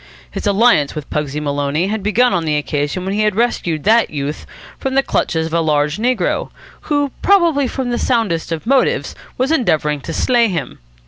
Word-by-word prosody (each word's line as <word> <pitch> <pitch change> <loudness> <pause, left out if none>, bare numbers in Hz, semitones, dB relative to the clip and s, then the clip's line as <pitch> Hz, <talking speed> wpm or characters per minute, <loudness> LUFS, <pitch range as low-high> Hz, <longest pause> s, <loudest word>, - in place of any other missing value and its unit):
His - - -4
alliance 200 -8 +3
with 150 -2 -6
Pugsy 150 -1 -2
Maloney 145 +2 -1
had 210 +2 -2
begun 230 +5 +2
on 170 - 0
the 155 -2 0
occasion 145 +4 -2
when 190 - -2
he 210 - 0
had 210 -2 +1
rescued 180 -9 -1
that 225 +3 +4
youth 145 0 -5 0.3
from 265 0 -2
the 270 - +4
clutches 160 -10 -1
of 160 - -6
a 170 - +2
large 150 -1 +1
negro, 245 +3 0 0.4
who, 290 -2 +1
probably 340 -8 +3
from 250 0 -3
the 240 - -1
soundest 210 -11 0
of 165 +2 -4
motives, 265 +1 +1 0.2
was 260 +4 0
endeavouring 155 - +1
to 165 - -6
slay 240 +5 +2
him. 165 -9 -4
190 Hz, 190 wpm, -17 LUFS, 150-245 Hz, 0.4 s, that